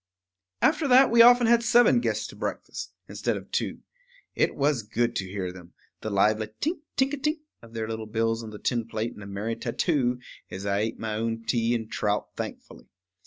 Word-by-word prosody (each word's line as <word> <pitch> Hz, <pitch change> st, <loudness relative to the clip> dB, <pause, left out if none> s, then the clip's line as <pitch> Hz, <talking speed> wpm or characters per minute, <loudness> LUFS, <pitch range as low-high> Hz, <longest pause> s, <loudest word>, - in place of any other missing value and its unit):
After 305 Hz, -, +3 dB
that 260 Hz, 0 st, +6 dB
we 235 Hz, -, +4 dB
had 230 Hz, -, +11 dB
often 240 Hz, -1 st, +5 dB
seven 240 Hz, +1 st, +5 dB
guests -, -, -1 dB
to -, -, -11 dB
breakfast, -, -, -5 dB, 0.2 s
instead -, -, -2 dB
of -, -, -11 dB
two. -, -, -2 dB, 0.5 s
It -, -, +1 dB
was 140 Hz, -3 st, +1 dB
good 115 Hz, +3 st, -1 dB
to 95 Hz, -, -2 dB
hear 95 Hz, -2 st, -3 dB
them, 90 Hz, -1 st, -13 dB, 0.3 s
the 110 Hz, -, -3 dB
lively 105 Hz, +2 st, +2 dB
tink, 320 Hz, +4 st, -1 dB, 0.2 s
tink 265 Hz, +2 st, +2 dB
a -, -, -1 dB
tink 300 Hz, +3 st, -1 dB, 0.2 s
of 115 Hz, -1 st, -15 dB
their 110 Hz, -1 st, -2 dB
little 110 Hz, -1 st, -5 dB
bills 115 Hz, +1 st, 0 dB
on 110 Hz, -, -7 dB
the 105 Hz, -, -9 dB
tin 115 Hz, +1 st, -1 dB
plate 110 Hz, +1 st, -3 dB
in -, -, -11 dB
a 100 Hz, -, -8 dB
merry 105 Hz, +3 st, -3 dB
tattoo, 125 Hz, 0 st, 0 dB, 0.3 s
as 95 Hz, +1 st, -7 dB
I 100 Hz, 0 st, +1 dB
ate 110 Hz, +1 st, -2 dB
my 110 Hz, -1 st, -3 dB
own 115 Hz, +1 st, -2 dB
tea 115 Hz, 0 st, +1 dB
and 110 Hz, -2 st, -3 dB
trout 105 Hz, 0 st, -1 dB
thankfully. -, -, -7 dB
115 Hz, 205 wpm, -26 LUFS, -, 0.5 s, had